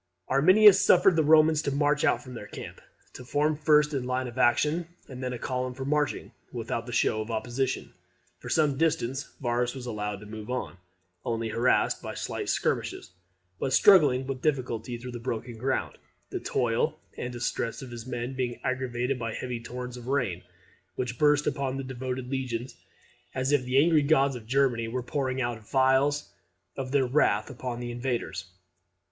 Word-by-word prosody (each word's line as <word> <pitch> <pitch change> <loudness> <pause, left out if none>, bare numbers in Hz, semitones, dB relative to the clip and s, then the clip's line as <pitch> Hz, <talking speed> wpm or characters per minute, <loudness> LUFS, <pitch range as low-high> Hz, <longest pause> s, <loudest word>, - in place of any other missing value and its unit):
] 90 - -52
Arminius 190 +8 +7
suffered 180 -1 +5
the 160 - +3
Romans 155 0 +5
to 145 - -1
march 145 +1 +1
out - - +2
from 130 -2 -10
their 110 -3 -8
camp, - - -9 0.3
to 125 - -9
form 150 +4 +1
first 150 0 +3
in 135 -3 -1
line 130 0 -1
for 130 - -7
action, 150 +7 +2 0.2
and 130 -1 -8
then 130 -1 -2
in 125 - -4
column 125 +1 -3
for 130 +1 -5
marching, 150 0 -1 0.2
without 115 0 -4
the - - -6
show 110 -2 +1
of 110 - -6
opposition. 120 +4 -2 0.5
For - - -8
some 150 -4 +2
distance 135 -5 0
Varus 120 0 0
was 130 -2 -7
allowed 105 -3 -3
to - - -10
move 110 +1 -8
on, 125 -7 -3 0.5
only 115 -1 -2
harassed 120 +3 +2
by - - -6
slight - - -4
skirmishes, - - -1 0.5
but 135 - -1
struggling 145 -7 +6
with 130 -1 -4
difficulty 125 -5 -1
through 125 +1 -8
the 120 - -6
broken 115 0 -5
ground; 135 +3 -2 0.3
the - - -2
toil - - 0 0.2
and 125 - -4
distress 120 0 -3
of 130 - -9
his 120 0 -8
men 120 +1 -4
being 125 -2 -3
aggravated 130 0 -1
by 115 -1 -3
heavy 125 -2 -4
torrents 125 +1 -6
of 120 0 -10
rain, 120 -10 0 0.5
which 125 -1 -3
burst 150 -1 +4
upon 135 -2 -1
the 135 - -4
devoted 130 -1 -4
legions 130 -2 -3 0.6
as 130 +1 0
if 140 -3 +2
the 125 +1 +1
angry 155 +1 +5
gods 140 -2 +3
of 115 -3 -9
Germany 125 -3 +2
were 125 +2 -3
pouring 130 0 -2
out 120 -2 -2
the - - -22
vials 135 +2 +2 0.4
of 130 -1 -5
their 140 -2 +3
wrath 125 -3 +2
upon 125 -1 -5
the 120 0 -4
invaders. 120 -6 -3
130 Hz, 185 wpm, -28 LUFS, 120-140 Hz, 0.6 s, Arminius